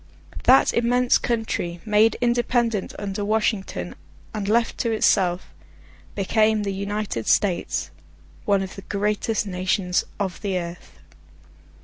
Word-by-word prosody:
That 260 +2 +6
immense 245 +1 +3
country, 220 -7 -2
made 215 +1 +3
independent 240 -3 0
under 205 0 -4
Washington, 210 -1 -1 0.4
and 210 -2 -3
left 230 +1 +1
to 230 - 0
itself, 185 -4 +1 0.6
became 215 +2 +2
the 200 -1 -2
United 200 - -3
States; 185 -4 +1 0.5
one 200 -2 +2
of 190 - -8
the 195 - -8
greatest 210 +2 -1
nations 185 -1 0 0.2
of 190 -3 -3
the 195 -3 -1
earth. 170 0 -7
205 Hz, 115 wpm, -23 LUFS, 190-225 Hz, 0.6 s, That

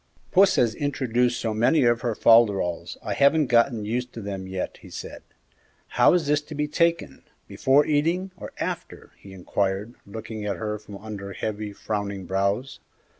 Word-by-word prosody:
"Puss 195 0 +5
has 115 -3 +3
introduced 125 -4 0
so 110 -2 -2
many 120 +7 +3
of 120 -1 +3
her 120 -3 -1
folderols 100 -8 +3
I - - -2
haven't 150 +2 +4
got 120 +1 +4
used 120 +3 -3
to 115 - -7
them 100 -2 -5
yet," 95 -1 -4
he - - -14
said. - - -8 0.7
"How - - +4
is 170 -3 +1
this 150 +1 +2
to 150 +1 -10
be 150 0 -1
taken, 170 +2 0 0.3
before 135 +3 +3
eating, 165 +6 0
or - - -9
after?" - - -5
he 100 - -13
inquired, 95 +3 -2
looking 110 +1 -7
at 105 -1 -2
her 105 -1 -3
from 105 -1 -10
under 100 -2 -7
heavy, 105 0 -4
frowning 100 -2 -4
brows. 100 +7 -1
115 Hz, 170 wpm, -25 LUFS, 100-140 Hz, 0.7 s, Puss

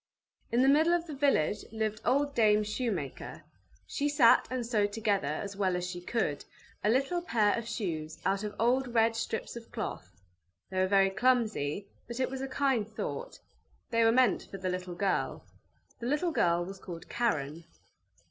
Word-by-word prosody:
In 240 +2 +3
the - - +4
middle 310 +5 +5
of 340 -1 -2
the 315 - -7
village 270 - +1
lived 215 -1 -2
old 285 +3 +2
Dame 215 -3 +4
Shoemaker; 210 - -4 0.4
she 290 0 -1
sat 280 -6 +5
and 255 -2 -2
sewed 210 -3 +1
together, 205 -7 0
as 195 +7 -3
well 190 -2 +1
as 180 0 -2
she 175 -1 -6
could, 175 -7 -1 0.4
a 210 - +3
little 275 +9 +1
pair 220 -10 +2
of 235 -1 -4
shoes 165 -9 -4
out 195 +1 +1
of 210 -1 -4
old 245 +2 +1
red 225 0 +4
strips 225 0 -3
of 235 -1 -10
cloth; 95 - -6 0.5
they 185 - -1
were 185 - +3
very 195 0 +4
clumsy, 215 - +1 0.2
but 235 +1 -6
it 255 - 0
was 265 0 -4
a 270 - -2
kind 265 -6 +1
thought. 470 - -6 0.5
They 230 0 +3
were 225 - +5
meant 255 +1 +3
for 195 - -7
the 185 -1 -3
little 180 -1 -4
girl. 195 +2 -1 0.5
The 235 - -4
little 300 +6 +1
girl 175 - +2
was 195 +1 -8
called 170 -2 -9
Karen. 160 -8 -1
220 Hz, 180 wpm, -30 LUFS, 190-255 Hz, 0.5 s, middle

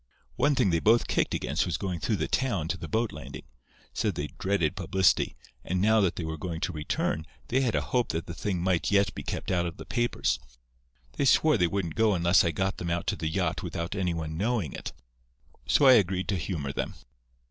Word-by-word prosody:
"One 145 0 +2
thing 95 - +3
they 85 - +2
both 115 +6 +4
kicked - - 0
against - - 0
was 90 - -1
going 90 -4 -3
through 70 - 0
the - - -2
town 105 -12 0
to 90 - -1
the - - -6
boat 115 0 0
landing. 70 -3 -9 0.5
Said - - -1
they 75 0 -3
dreaded 95 -6 +1
publicity, 95 0 +2 0.3
and 90 +1 -1
now 110 +3 +4
that 95 -3 +1
they 85 - -4
were 80 -1 -5
going 85 -1 -4
to 95 - -1
return, 75 0 -2 0.3
they 130 +2 +2
had 125 -4 +1
a - - +2
hope 125 -2 0
that 80 +1 -2
the 85 - -6
thing 90 -3 -2
might 90 -2 +1
yet 100 -4 +3
be - - -6
kept - - -4
out 90 -1 +1
of 85 - -7
the - - -9
papers. 120 - 0 0.8
They - - +1
swore 155 +3 +5
they 90 - +3
wouldn't 85 -3 -2
go 110 0 +3
unless 85 +2 +4
I 85 - +2
got 95 +4 -1
them 85 - -4
out 85 0 -1
to - - 0
the 80 - -3
yacht - - -1
without 85 +2 -4
any 90 -4 -1
one 80 -1 -4
knowing 105 - -1
it, - - -6 0.8
so 145 - +4
I 130 - +9
agreed 95 -4 +2
to 100 - +1
humour 80 -5 -3
them. - - -3
90 Hz, 225 wpm, -28 LUFS, 85-105 Hz, 0.8 s, I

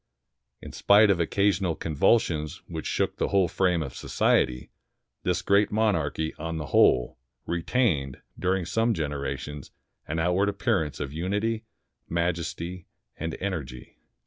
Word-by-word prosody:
In - - -8
spite 105 0 +5
of 90 - +1
occasional 95 0 +1
convulsions 80 -2 +1
which - - -5
shook - - -1
the - - 0
whole 95 -2 +3
frame 90 -1 +1
of 70 -4 -8
society, 60 0 +1 0.5
this - - -1
great 100 +1 +3
monarchy, 85 -8 0
on 80 +1 -3
the 75 - -4
whole, - - +3 0.3
retained, 85 - 0 0.2
during 95 -1 0
some 115 +5 +1
generations, 70 -2 -4 0.4
an 80 - -3
outward 90 +5 +2
appearance 100 - -1
of 70 -1 -4
unity, 105 +7 -1 0.4
majesty, 85 +1 -2 0.3
and 80 0 -4
energy. 70 -11 -5
85 Hz, 125 wpm, -26 LUFS, 75-100 Hz, 0.5 s, spite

